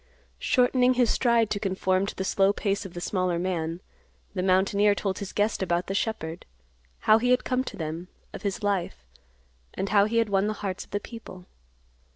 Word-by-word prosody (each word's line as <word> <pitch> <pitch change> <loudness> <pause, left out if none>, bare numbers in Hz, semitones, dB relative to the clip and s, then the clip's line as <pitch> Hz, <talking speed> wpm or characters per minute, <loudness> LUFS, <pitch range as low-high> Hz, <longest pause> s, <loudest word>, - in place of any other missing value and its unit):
Shortening 250 0 +3
his 245 -2 +3
stride 235 -3 +2
to 205 - 0
conform 190 -1 0
to - - -5
the 190 - -3
slow 195 +1 +3
pace 200 -1 -1
of 175 - -16
the 175 - -5
smaller 185 -2 0
man, 170 -1 -2 0.5
the 185 - -2
mountaineer 200 +2 +3
told 195 -2 -2
his 200 - -5
guest 210 0 0
about 175 -1 0
the 195 - -3
shepherd; 180 -6 -2 0.6
how 215 +1 +5
he 245 +2 0
had 250 0 +3
come 255 0 0
to - - -7
them; 165 +2 -5 0.3
of - - -7
his 205 0 -3
life; 180 - -1 0.7
and 195 - -2
how 200 -1 +5
he 225 +2 -1
had 230 -2 +2
won 195 0 +2
the 215 - 0
hearts 190 -1 -3
of - - -21
the 205 - -2
people. 205 -5 -10
200 Hz, 200 wpm, -26 LUFS, 185-215 Hz, 0.7 s, how